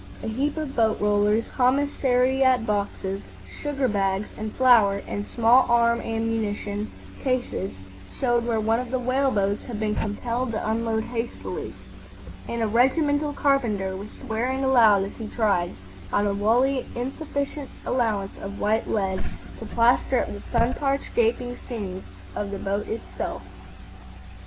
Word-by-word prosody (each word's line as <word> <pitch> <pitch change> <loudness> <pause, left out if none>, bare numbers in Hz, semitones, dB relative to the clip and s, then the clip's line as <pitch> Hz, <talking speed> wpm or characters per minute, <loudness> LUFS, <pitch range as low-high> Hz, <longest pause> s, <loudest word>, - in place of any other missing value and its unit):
A - - -3
heap 275 +8 -1
of 305 -3 -4
boat 220 -2 +2
rollers, 210 +2 +2
commissariat 260 -1 +3
boxes, 200 -2 -2 0.4
sugar 280 -3 0
bags, 195 -1 0
and 215 0 -4
flour 225 -6 +5
and 205 0 -4
small 240 +2 +4
arm 235 0 +4
ammunition 220 -2 -2 0.3
cases 255 -7 -1 0.5
showed 240 -2 +2
where 230 -2 0
one 225 +2 +2
of 250 -1 -4
the 260 - 0
whale 255 +2 +1
boats 200 -3 0
had 230 -4 -5
been 215 -1 0
compelled 230 +4 -2
to 215 - -2
unload 225 0 0
hastily; 235 0 -5 0.7
and 235 -1 -1
a - - +2
regimental 290 +6 +2
carpenter 230 -10 +1
was 200 +3 -7
swearing 250 +6 -2
aloud 225 -7 +5
as 195 - -5
he 225 - -5
tried, 200 -7 0 0.4
on 205 - +2
a 200 - +1
wholly 245 +6 +2
insufficient 280 +2 -3 0.2
allowance 215 -6 0
of 200 +1 -6
white 220 +2 +1
lead, 190 -3 0 0.4
to 225 - -7
plaster 240 +3 +3
up - - -6
the 205 - -8
sun 235 +1 +2
parched 275 -1 -1
gaping 245 +1 +1
seams 195 -6 -4 0.3
of 205 - -2
the 200 - -4
boat 200 +1 -2
herself. 225 - -5
230 Hz, 145 wpm, -25 LUFS, 205-255 Hz, 0.7 s, flour